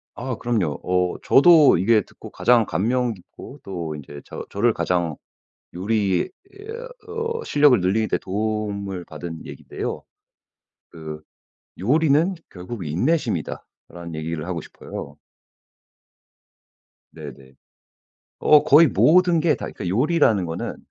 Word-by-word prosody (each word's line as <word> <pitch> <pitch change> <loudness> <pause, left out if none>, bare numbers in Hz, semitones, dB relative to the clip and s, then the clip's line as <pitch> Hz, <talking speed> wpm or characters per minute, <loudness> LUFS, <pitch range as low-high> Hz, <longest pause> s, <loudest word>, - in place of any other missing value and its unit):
아 130 +1 -4
그럼요. 105 -11 -1
어 90 -1 0
저도 155 - +6
이게 110 +5 +4
듣고 - - -14
가장 120 -3 +3
감명 120 +6 0
깊고 120 +8 -13
또 85 -5 -5
인제 75 -1 -10
저 - - -8
저를 115 +3 +2
가장 85 -6 -1 0.6
요리에 100 -1 0 0.2
에어 450 +5 -9 0.5
어 - - -6
실력을 145 -5 +4
늘리는 100 +5 +1
데 - - 0
도움을 100 -2 -3
받은 80 -2 -8
얘기인데요. - - -6 0.9
그 80 -2 -8 0.6
"요리는 155 - +2 0.2
결국 90 +1 -7
인내심이다."라는 85 - -3
얘기를 80 0 -4
하고 90 -2 -3
싶어요. - - -9 2.0
네네. 70 -4 -11 0.9
어 150 -1 +6
거의 155 +3 +6
모든 175 +1 +4
게 160 0 +3
다 - - -6
그러니까 90 - -6
요리라는 115 - +2
거는 80 0 -5
100 Hz, 255 characters per minute, -22 LUFS, 85-135 Hz, 2.0 s, 저도